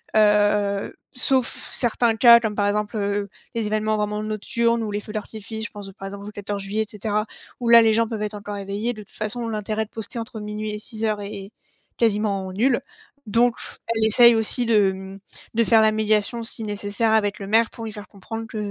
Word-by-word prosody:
heu, 205 -1 +3 0.2
sauf 260 0 +1
certains 235 -1 +2
cas, 235 +1 +8
comme 220 -2 -2
par 205 -1 +1
exemple, 210 +1 -1
heu, 200 0 -1 0.3
les 230 - 0
événements 215 0 0
vraiment 210 0 -2
nocturnes 230 +2 0
ou 210 - -3
les 205 - -2
feux 210 - -10
d'artifice, 220 0 -5
je - - -7
pense, 200 -2 -9
par 195 - -7
exemple, 200 0 -8
au 210 - -7
14 205 -1 -4
juillet, 210 +3 -1
et - - -8
cetera, 210 0 -1 0.3
où 240 - -3
là, 235 0 +9
les 220 -1 +4
gens 230 0 +2
peuvent 220 -2 -5
être 210 0 -3
encore 205 0 -6
éveillés. 200 +4 -3
De 215 - -9
toute - - -21
façon, 230 +2 -2
l'intérêt 215 0 -2
de - - -24
poster 225 +2 -5
entre 225 -1 -6
minuit 210 0 -4
et 210 - -4
06:00 215 -1 -3
est 200 -1 -7 0.5
quasiment 205 -4 0
nul, 240 +6 +2 0.5
donc 235 +3 +3 0.3
elle 225 -1 0
essaie 235 +2 +7
aussi 225 +2 +2
de, 210 -4 +4
mmh, 190 +1 -9 0.3
de 230 +1 +3
faire 225 -1 +5
la 215 0 +4
médiation, 215 +2 +1
si 225 0 0
nécessaire, 205 +1 -1
avec 210 -1 +1
le 195 - -6
maire, 225 +2 +3
pour 230 -2 -8
lui 220 - -5
faire 210 -1 -9
comprendre 225 +3 -7
que, 220 - -8
215 Hz, 210 wpm, -23 LUFS, 205-225 Hz, 0.5 s, là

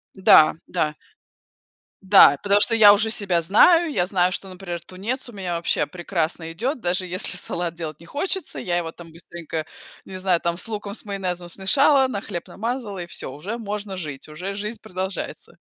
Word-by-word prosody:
Да, 185 -5 +6
да. 155 -4 -1 1.1
Да, 190 -7 +7
потому 205 0 +4
что 230 - +4
я 210 -2 +8
уже 220 +2 +1
себя 185 -6 +1
знаю, 325 - +5
я 180 -5 0
знаю, 180 -1 +1
что, 195 - -4
например, 180 -2 -7
тунец 210 - -4
у - - -11
меня 180 -3 -3
вообще 170 - 0
прекрасно 170 -2 -3
идет, 250 - -3
даже 180 -1 -1
если 180 0 0
салат 170 0 -2
делать 155 -3 -7
не 170 - -14
хочется, 360 - -1
я 175 -1 -1
его, 165 -2 -3
там, 165 0 -14
быстренько, 165 -1 -7 0.4
не 190 - -7
знаю, 185 -2 +1
там, 170 0 -1
с 180 - -1
луком, 205 -2 -5
с - - -4
майонезом 180 -4 -4
смешала, 265 - +3
на 200 -6 -4
хлеб 175 -6 -6
намазала, 225 -3 -4
и 175 - -6
всё, 170 - -4
уже 195 - -6
можно 205 -3 -5
жить, 145 -6 -7
уже 180 +6 -6
жизнь 210 +2 -5
продолжается. 190 -2 -6
185 Hz, 185 wpm, -22 LUFS, 170-210 Hz, 1.1 s, я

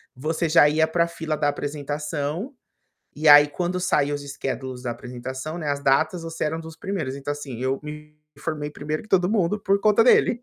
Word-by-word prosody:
você 160 +5 -1
já 155 -2 +6
ia 160 +1 +2
para 170 +1 +2
a - - -6
fila 160 -2 -4
da 145 - +2
apresentação, 150 - -4 0.6
e 155 +2 0
aí, 145 0 +9
quando 180 +4 -2
saiu 145 -6 +1
os 145 - -6
schedules 135 -2 -5
da 120 - -2
apresentação, 130 +6 -6
né, 155 -4 -3
as 140 0 -1
datas, 155 +5 +2
você 165 0 -4
era 160 +1 -1
um - - -6
dos 160 0 -10
primeiros, 165 -9 -3
então, 140 +1 -4
assim, 140 -5 -7
eu 130 +1 0
me 150 0 -9 0.3
formei 150 -2 -3
primeiro 150 +3 -4
que - - -17
todo 180 -1 +3
mundo 210 -2 +1
por 200 0 +1
conta 215 +1 +5
dele. 245 -1 +4
150 Hz, 205 wpm, -24 LUFS, 145-170 Hz, 0.6 s, aí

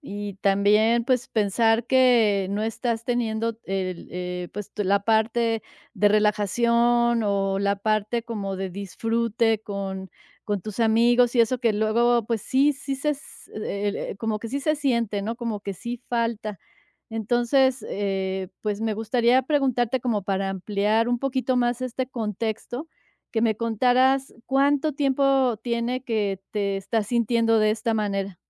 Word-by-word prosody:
Y 205 - -6
también, 210 +4 +3
pues, 250 -1 +1
pensar 225 +2 +1
que 235 -7 +4
no 205 +1 -1
estás 225 +1 -2
teniendo 230 -2 -1
el, 185 -2 -3
eh, 180 0 -4
pues, 210 0 -7
la 200 -1 +2
parte 225 +1 +1 0.3
de 205 - +4
relajación, 235 +3 +2
o 195 -1 0
la 200 0 +1
parte 215 +2 0
como 205 -4 -4
de 190 0 -4
disfrute 225 +3 -1
con 195 -2 -5 0.4
con 205 -2 -2
tus 215 +4 -8
amigos, 235 +2 +4
y 240 - +5
eso 235 +2 +2
que 230 -2 +2
luego, 230 +2 +2
pues, 225 0 -1
sí 275 +3 +3
sí 275 0 -5
se 295 +2 -1 1.0
como 225 -2 -1
que 230 - -7
sí 275 +4 -3
se 305 +2 +1
siente, 235 -8 0
¿no?, 220 +3 -3
como 230 -3 -4
que 200 -1 -6
sí 235 +5 -6
falta. 230 -5 -2 0.5
Entonces, 240 +3 +1
eh, 190 -2 -2
pues, 210 -1 -2
me 220 -1 -1
gustaría 235 +3 +2
preguntarte 260 -3 +1
como 230 -4 -1
para 195 0 -1
ampliar 205 +4 0
un 245 0 +1
poquito 260 -1 -1
más 240 0 +1
este 255 +1 -3
contexto 225 - -4 0.5
que 225 - 0
me 220 -2 +2
contaras, 255 +4 +2
¿cuánto 285 +3 +2
tiempo 270 -4 +2
tiene, 240 +1 -1
que 205 -5 -1
te 200 -2 -1
estás 210 +2 -2
sintiendo 230 -1 +2
de 215 0 +3
esta 225 +1 -1
manera? 200 -3 -2
225 Hz, 145 wpm, -24 LUFS, 205-240 Hz, 1.0 s, y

